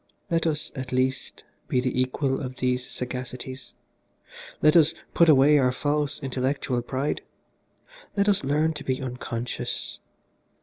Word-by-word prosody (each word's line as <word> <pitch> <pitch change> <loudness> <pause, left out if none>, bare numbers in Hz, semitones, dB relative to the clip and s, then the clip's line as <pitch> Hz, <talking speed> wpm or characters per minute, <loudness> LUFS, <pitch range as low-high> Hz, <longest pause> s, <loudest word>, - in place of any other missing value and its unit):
Let 165 0 +2
us, 150 -1 -1
at 130 -2 -6
least, 130 +1 -1 0.2
be 125 - +1
the 125 0 +1
equal 135 +1 0
of 130 -2 -5
these 125 0 0
sagacities. 125 0 -6 0.9
Let 155 +1 +5
us 160 -1 +6 0.2
put 170 -1 +5
away 145 +1 +6
our 125 -2 +3
false 145 +2 0
intellectual 130 -1 -1
pride. 130 +4 -2 1.0
Let 200 +1 +3
us 200 -6 +3
learn 150 +4 +2
to 150 -2 -7
be 130 -1 -1
unconscious. 125 -2 -4
130 Hz, 135 wpm, -26 LUFS, 125-150 Hz, 1.0 s, us